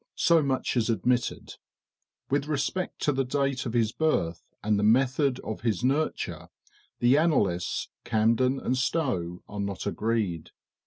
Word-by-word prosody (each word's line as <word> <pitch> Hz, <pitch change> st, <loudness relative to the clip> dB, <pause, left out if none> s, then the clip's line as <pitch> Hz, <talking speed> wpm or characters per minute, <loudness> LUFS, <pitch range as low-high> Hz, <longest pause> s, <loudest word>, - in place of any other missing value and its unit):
So 170 Hz, -1 st, +4 dB
much 135 Hz, -3 st, -1 dB
is 120 Hz, -1 st, +1 dB
admitted; 120 Hz, +2 st, -1 dB, 0.7 s
with 140 Hz, +1 st, +1 dB
respect 155 Hz, +5 st, -2 dB
to 145 Hz, -, +3 dB
the 135 Hz, -1 st, 0 dB
date 135 Hz, 0 st, -1 dB
of 115 Hz, -, -4 dB
his 115 Hz, -2 st, +2 dB
birth, 85 Hz, -, 0 dB, 0.2 s
and 105 Hz, -1 st, +2 dB
the -, -, 0 dB
method 130 Hz, +4 st, +3 dB
of 110 Hz, -, -6 dB
his 115 Hz, -3 st, -1 dB
nurture, 140 Hz, +5 st, -1 dB, 0.5 s
the 125 Hz, +4 st, +4 dB
annalists, 105 Hz, -, +1 dB
Camden 115 Hz, +4 st, +2 dB
and 130 Hz, -, -1 dB
Stowe, 125 Hz, -, -1 dB
are 105 Hz, -, -7 dB
not 100 Hz, -2 st, -3 dB
agreed. 105 Hz, -8 st, -1 dB
125 Hz, 145 wpm, -27 LUFS, 105-140 Hz, 0.7 s, So